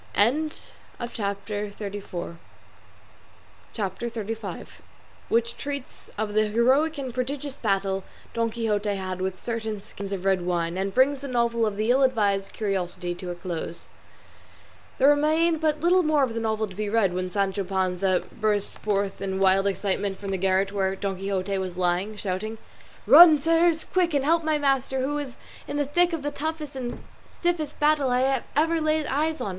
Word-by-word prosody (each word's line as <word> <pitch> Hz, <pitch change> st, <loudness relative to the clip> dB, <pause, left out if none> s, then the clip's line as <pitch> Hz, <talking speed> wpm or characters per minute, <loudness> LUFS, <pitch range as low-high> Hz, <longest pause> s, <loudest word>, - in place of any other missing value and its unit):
CHAPTER 210 Hz, -5 st, -2 dB
XXXV. 200 Hz, -4 st, -6 dB, 2.9 s
WHICH 235 Hz, 0 st, +1 dB
TREATS 280 Hz, -2 st, -6 dB
OF 210 Hz, -1 st, -2 dB
THE 215 Hz, 0 st, +3 dB
HEROIC 260 Hz, +9 st, +2 dB
AND 260 Hz, -3 st, -4 dB
PRODIGIOUS 270 Hz, +2 st, -3 dB
BATTLE 195 Hz, -2 st, 0 dB, 0.3 s
DON 230 Hz, 0 st, 0 dB
QUIXOTE 215 Hz, -3 st, -1 dB
HAD 185 Hz, -1 st, -4 dB
WITH 190 Hz, 0 st, -2 dB
CERTAIN 220 Hz, -3 st, -3 dB
SKINS 200 Hz, -1 st, -8 dB
OF 195 Hz, -1 st, -4 dB
RED 190 Hz, -2 st, +3 dB
WINE, 175 Hz, -1 st, -1 dB
AND 195 Hz, 0 st, -2 dB
BRINGS 270 Hz, +2 st, +3 dB
THE 280 Hz, -, -5 dB
NOVEL 235 Hz, -2 st, +1 dB
OF 205 Hz, -1 st, -3 dB
"THE 215 Hz, +3 st, +2 dB
ILL 265 Hz, +2 st, +4 dB
ADVISED 205 Hz, -7 st, +2 dB
CURIOSITY" 180 Hz, -4 st, -2 dB
TO 180 Hz, +1 st, -7 dB
A 175 Hz, -, -4 dB
CLOSE 175 Hz, -1 st, -6 dB, 1.1 s
There 270 Hz, -, +5 dB
remained 310 Hz, +3 st, +3 dB
but 305 Hz, -1 st, +1 dB
little 360 Hz, +2 st, +4 dB
more 305 Hz, -4 st, +3 dB
of 245 Hz, -4 st, 0 dB
the 230 Hz, -, -2 dB
novel 220 Hz, -1 st, 0 dB
to 190 Hz, -3 st, -11 dB
be 210 Hz, +1 st, -2 dB
read, 205 Hz, -4 st, +2 dB
when 185 Hz, 0 st, -2 dB
Sancho 195 Hz, +1 st, 0 dB
Panza 185 Hz, -1 st, 0 dB
burst 210 Hz, -2 st, 0 dB
forth 200 Hz, -2 st, -1 dB
in 190 Hz, -1 st, -2 dB
wild 195 Hz, +1 st, +4 dB
excitement 195 Hz, 0 st, -1 dB
from 200 Hz, -1 st, -5 dB
the 190 Hz, -, 0 dB
garret 190 Hz, +1 st, +1 dB
where 195 Hz, -1 st, 0 dB
Don 195 Hz, -1 st, -3 dB
Quixote 195 Hz, 0 st, -2 dB
was 185 Hz, -2 st, -4 dB
lying, 180 Hz, +4 st, 0 dB
shouting, 210 Hz, +2 st, -3 dB, 0.5 s
"Run, 330 Hz, -3 st, +9 dB
sirs! 330 Hz, +2 st, +3 dB
quick; 350 Hz, -4 st, +1 dB
and 275 Hz, -1 st, +1 dB
help 330 Hz, +2 st, +3 dB
my 310 Hz, -1 st, +1 dB
master, 270 Hz, -2 st, +1 dB
who 290 Hz, +3 st, -1 dB
is 270 Hz, -4 st, -6 dB, 0.3 s
in -, -, -3 dB
the 290 Hz, -, +1 dB
thick 350 Hz, +5 st, +2 dB
of 325 Hz, -4 st, -3 dB
the 290 Hz, -, -2 dB
toughest 300 Hz, 0 st, -4 dB
and 250 Hz, -2 st, -5 dB, 0.3 s
stiffest 330 Hz, -4 st, -2 dB
battle 295 Hz, -3 st, +3 dB
I 260 Hz, +1 st, +2 dB
ever 325 Hz, +2 st, +2 dB
laid 310 Hz, 0 st, +1 dB
eyes 310 Hz, +3 st, 0 dB
on. -, -, -2 dB
220 Hz, 165 wpm, -25 LUFS, 195-285 Hz, 2.9 s, Run